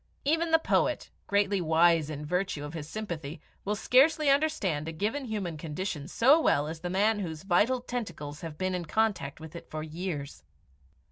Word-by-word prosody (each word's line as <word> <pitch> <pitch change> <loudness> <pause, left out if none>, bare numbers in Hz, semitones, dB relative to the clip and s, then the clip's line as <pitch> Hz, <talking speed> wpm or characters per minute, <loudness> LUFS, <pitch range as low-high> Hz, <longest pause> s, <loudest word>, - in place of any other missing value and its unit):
Even 325 +3 +2
the 325 - +6
poet, 320 - 0 0.2
greatly 200 -1 +2
wise 165 -1 +4
in 150 -1 -5
virtue 180 -3 -1
of 145 - -8
his 155 -2 -6
sympathy, 170 -8 -5 0.2
will 210 +1 -1
scarcely 285 +7 +4
understand 230 - +1
a - - -2
given 215 - -2
human 200 -8 -3
condition 150 -1 -4
so 270 - +5
well 145 - +3
as 160 +1 -6
the 175 - -4
man 205 +4 +2
whose 160 -5 -5
vital 205 +7 +3
tentacles 170 -13 -5
have 160 -3 -7
been 185 +2 -1
in 180 -2 -3
contact 190 -7 0
with 160 +1 -10
it 170 - -9
for 155 0 -4
years. 155 -3 -5
180 Hz, 180 wpm, -29 LUFS, 155-220 Hz, 0.2 s, the